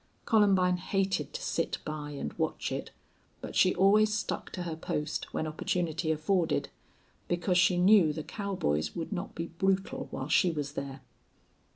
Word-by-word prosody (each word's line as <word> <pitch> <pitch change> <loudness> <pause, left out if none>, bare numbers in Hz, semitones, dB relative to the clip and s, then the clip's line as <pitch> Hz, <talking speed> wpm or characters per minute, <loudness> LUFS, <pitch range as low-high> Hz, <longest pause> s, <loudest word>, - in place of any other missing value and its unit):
Columbine 195 -5 +4
hated 195 +1 -1
to 485 +1 -5
sit - - -1
by 150 -1 -4
and 140 - -5
watch - - -2
it, - - -4 0.5
but - - -8
she 185 - +4
always 210 +3 +5
stuck 215 - -2
to 180 - -3
her 165 -2 -4
post, 150 -1 -3
when - - -2
opportunity 160 +1 -1
afforded, 160 +1 +1 0.6
because 175 +1 +1
she 180 0 +4
knew 180 -3 +6
the 155 0 -5
cowboys 170 - -2
would 165 +2 -4
not 190 +1 -5
be 165 - -3
brutal 195 0 0
while 130 - -5
she 170 +3 +4
was 145 -3 -3
there. 140 -2 -5
175 Hz, 160 wpm, -30 LUFS, 155-195 Hz, 0.6 s, knew